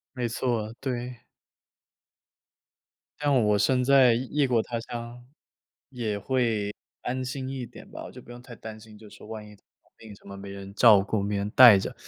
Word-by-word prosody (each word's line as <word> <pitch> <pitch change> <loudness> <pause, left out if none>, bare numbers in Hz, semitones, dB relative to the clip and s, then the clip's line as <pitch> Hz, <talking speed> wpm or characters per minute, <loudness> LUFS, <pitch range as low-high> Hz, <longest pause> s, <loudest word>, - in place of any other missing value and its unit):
没 120 -2 -2
错， 115 -2 -2
对。 125 -2 -4 2.0
这 145 - -4
样 130 -6 +3
我 105 -1 +3
身 125 +4 +2
在 130 -3 +6
异 120 - -1 0.2
异 - - +4
国 120 -3 +2
他 115 -1 -4
乡， 120 +1 -8 0.7
也 110 -5 -3
会 125 +2 0 0.5
安 130 +1 -3
心 130 +1 -5
一 130 -3 -5
点 120 - -14
吧。 - - -8
我 - - -9
就 125 - -12
不 - - -16
用 120 0 -10
太 125 -1 -12
担 110 -1 -9
心， 110 -1 -15
就 105 0 -14
是 - - -15
说 - - -14
万 110 -1 -8
一 - - -14
生 - - -19 0.4
病 110 -2 -12
什 100 - -20
么 100 0 -9
没 100 0 -9
人 100 0 -9
照 105 -3 +7
顾、 100 +1 -2
没 100 0 -2
人 100 +1 -2
带 120 -6 +9
着。 - - -5
115 Hz, 220 characters per minute, -26 LUFS, 105-125 Hz, 2.0 s, 带